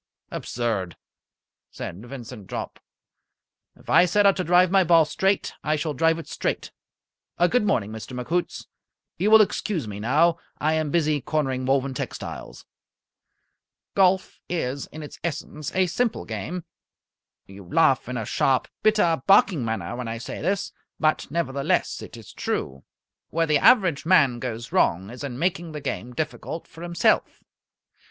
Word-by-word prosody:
"Absurd!" 110 -7 -3 0.7
said 95 +6 -7
Vincent 120 -5 -9
Jopp. - - -5 1.0
"If - - -21
I - - +6
set 205 +4 +2
out 195 - +6
to 185 - 0
drive 180 +1 +4
my 195 -1 +5
ball 165 -2 +5
straight, 195 +4 0
I 155 - +1
shall 155 0 -2
drive 165 +4 +2
it 165 - -8
straight. - - -3 0.7
Good 195 +6 +3
morning, 110 - +1
Mr. 110 +3 -7
McHoots. 170 +8 -2 0.5
You 200 +4 +2
will 220 0 +9
excuse 190 - -3
me 100 -1 -6
now. 155 +9 +3 0.2
I 155 +1 +1
am 155 -1 0
busy 155 -2 +1
cornering 130 -4 -1
Woven 135 0 +1
Textiles." - - -6 1.3
Golf 190 -1 +2
is 140 -6 -2
in 155 0 -9
its 150 - -10
essence 155 -2 -4
a 185 0 +4
simple 225 +6 -1
game. 180 -1 -5 0.8
You 95 0 -12
laugh 135 - +2
in 125 - -3
a 115 - -3
sharp, 130 +4 +1
bitter, 210 -9 +3
barking 195 -7 +5
manner 110 -3 -3
when 125 -1 -5
I 115 0 -3
say 115 - -7
this, 195 +5 -1 0.3
but 155 0 +1
nevertheless 140 -3 -1
it - - -10
is - - -12
true. 65 0 -3 0.5
Where 165 +1 +1
the 150 -2 +3
average 185 - +4
man 140 -9 +4
goes 120 -2 -5
wrong 95 +5 +1
is 125 +3 -9
in 130 -4 -5
making 170 0 -1
the 150 - -4
game 125 -3 -4
difficult 155 +4 -4
for 165 - -14
himself. 170 -1 +1
155 Hz, 155 wpm, -24 LUFS, 125-175 Hz, 1.3 s, will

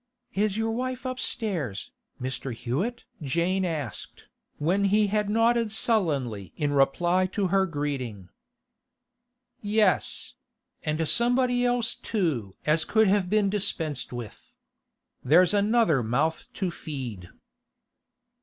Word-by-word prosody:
'Is 205 0 0
your 225 0 0
wife 255 +2 -3
upstairs, 205 - -2 0.3
Mr. 130 +1 -4
Hewett?' 160 - -3 0.2
Jane 170 +7 0
asked, 155 - -5 0.3
when 185 +7 +1
he 210 +2 +4
had 210 -1 +1
nodded 230 0 +2
sullenly 140 - 0
in 145 -1 0
reply 175 +7 +3
to 190 0 -1
her 190 +1 +3
greeting. 135 - -4 1.3
'Yes; 210 -2 +1 0.5
and 155 +1 -1
somebody 245 - +3
else 245 -2 +1
too 155 - -2
as 155 +1 +2
could 220 -2 +3
have 195 -2 +2
been 205 -1 +2
dispensed 160 -9 -1
with. 120 -4 -9 0.7
There's 175 +8 +5
another 205 - +3
mouth 140 +8 0
to 190 -4 -1
feed. 125 - -6
185 Hz, 110 wpm, -27 LUFS, 140-215 Hz, 1.3 s, There's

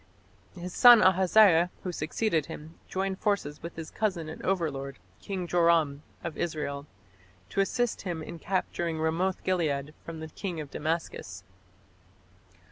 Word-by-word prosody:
His 180 0 -7
son 240 -3 +9
Ahaziah, 185 -1 +5
who 185 - -2
succeeded 160 0 -1
him, 155 +2 -9
joined 190 0 -2
forces 175 -8 -1
with 170 +1 -7
his 160 -1 -7
cousin 185 -7 -1
and 160 - -8
overlord, 145 -8 -2 0.2
King 190 -3 -4
Joram 165 -5 +3 0.2
of 165 - -5
Israel, 150 -3 -3 0.6
to 195 - +1
assist 240 +4 0
him 170 -4 -4
in 170 - -8
capturing 175 -3 -1
Ramoth 170 +4 0
gilead 150 -6 0
from 165 -1 -7
the 160 0 -7
king 175 0 -5
of 145 -3 -7
Damascus. 150 - -3
170 Hz, 135 wpm, -29 LUFS, 155-185 Hz, 0.6 s, son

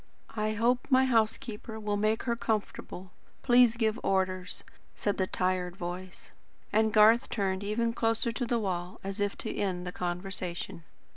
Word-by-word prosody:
"I 215 0 0
hope 240 +3 +1
my 260 -1 +5
housekeeper 225 -2 0
will 210 -1 -1
make 215 +2 +1
her 235 -2 0
comfortable. 210 -4 -3 0.3
Please 245 -2 +5
give 220 -1 +1
orders," 185 0 0 0.3
said 205 - -1
the 190 - +1
tired 180 -1 -1
voice; 180 0 -7 0.4
and 220 +1 +3
Garth 220 +2 +6
turned 195 -2 -1
even 230 +3 0
closer 230 +1 +1
to 240 +1 -3
the 235 - +1
wall, 180 -4 -3
as 195 +1 -4
if 205 0 0
to 220 - -4
end 185 -3 -2
the 180 - -4
conversation. 180 -1 -4
210 Hz, 155 wpm, -30 LUFS, 185-230 Hz, 0.4 s, Garth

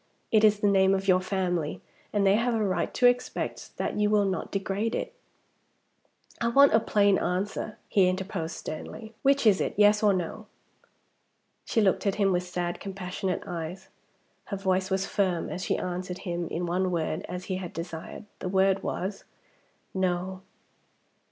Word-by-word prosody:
It 215 -1 +4
is 210 -1 +5
the 205 - +3
name 195 -1 +4
of 195 0 -3
your 185 -1 +5
family; 180 -5 -1 0.3
and 205 -1 +1
they 195 - +5
have 235 +2 +1
a 220 - +1
right 185 -2 0
to 250 - +3
expect 245 0 0
that - - -2
you 210 0 +3
will 210 -1 +3
not 190 -1 -2
degrade 200 +3 -1
it - - -3 0.7
" - - -32
"I 235 - +2
want 275 +3 +6
a 220 - +6
plain 205 -3 +3
answer," 200 +4 -2
he 190 -3 +4
interposed 185 -3 -3
sternly. 220 +8 -7
"Which 275 -2 +3
is 205 -3 +5
it? - - -2
Yes, 210 0 +5
or 210 -2 +5
No?" 195 +3 -3 1.2
She 225 - +1
looked 200 0 +2
at 195 - +1
him 200 -2 +2
with 180 -1 +2
sad 180 -1 -3
compassionate 190 -1 -4
eyes. 175 0 -6 0.6
Her 200 - -4
voice 190 -1 0
was 190 0 0
firm 190 -4 0
as 185 - -4
she - - +1
answered 180 0 -4
him 175 -2 -2
in 175 +2 -3
one 180 +2 0
word 160 -3 -2
as 180 0 -5
he 185 - -2
had 180 -2 -6
desired. 165 +4 -7
The 185 - -3
word 190 0 +3
was 195 +2 -4 0.7
"No." 185 0 -1
190 Hz, 175 wpm, -27 LUFS, 180-210 Hz, 1.2 s, want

